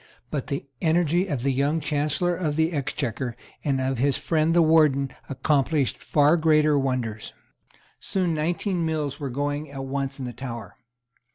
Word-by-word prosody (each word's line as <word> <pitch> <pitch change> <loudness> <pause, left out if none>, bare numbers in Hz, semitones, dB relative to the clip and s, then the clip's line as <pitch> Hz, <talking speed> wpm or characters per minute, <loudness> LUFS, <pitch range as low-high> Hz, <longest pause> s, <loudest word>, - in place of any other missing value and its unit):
But 145 -4 -3
the 140 -2 -3 0.2
energy 170 +2 +2
of 140 -8 -2
the 140 - +2
young 140 +5 +1
Chancellor 150 +3 0
of 160 -4 -1
the 160 +2 +1
Exchequer 125 -4 -2 0.3
and 135 -2 +1
of 130 -1 -1
his 140 +1 +2
friend 160 0 +1
the 170 - +6
Warden 150 -4 +4 0.2
accomplished 140 0 +1
far 150 +3 +4
greater 155 -2 +4
wonders. 125 -5 -2 0.7
Soon 185 -3 -1
nineteen 170 +3 -1
mills 155 -3 -2
were 140 -2 -3
going 145 +3 -2
at 135 -1 -6
once 135 0 -3
in 135 - -5
the 120 - -5
Tower. 115 -4 -7
145 Hz, 160 wpm, -25 LUFS, 135-160 Hz, 0.7 s, the